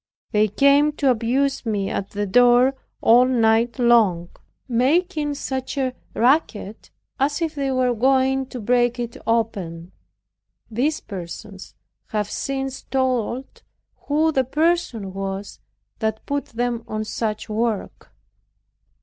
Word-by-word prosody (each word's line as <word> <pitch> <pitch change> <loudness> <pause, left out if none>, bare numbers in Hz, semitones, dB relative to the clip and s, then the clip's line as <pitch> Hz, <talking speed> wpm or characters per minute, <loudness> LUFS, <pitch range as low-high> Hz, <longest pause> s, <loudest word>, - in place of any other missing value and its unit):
They 215 -1 +3
came 280 +7 +4
to 280 -3 +2
abuse 255 +4 0
me 205 -4 -1
at 195 - -3
the 205 0 -3
door 245 +5 +5 0.3
all 240 +2 +6
night 230 -1 +2
long, 220 -9 +3 0.4
making 295 +5 +1
such 265 0 -4
a 260 -2 0 0.2
racket 230 -5 0 0.3
as 285 +3 +1
if 325 -2 -1
they 275 -2 -2
were 255 -1 +2
going 265 +2 +2
to 255 - -7
break 240 +2 +2
it 235 -1 -4
open. 190 -7 -1 0.8
These 280 +8 0
persons 190 +1 -9 0.3
have 210 -1 -2
since 270 -1 -3
told 260 -1 -2 0.5
who 310 +2 +2
the 265 -3 +2
person 265 - 0
was 195 +1 -5 0.4
that 220 0 -2
put 285 0 -2
them 235 0 -3
on 215 -1 -3
such 215 0 -3
work. 220 -1 -3
245 Hz, 125 wpm, -22 LUFS, 215-270 Hz, 0.8 s, all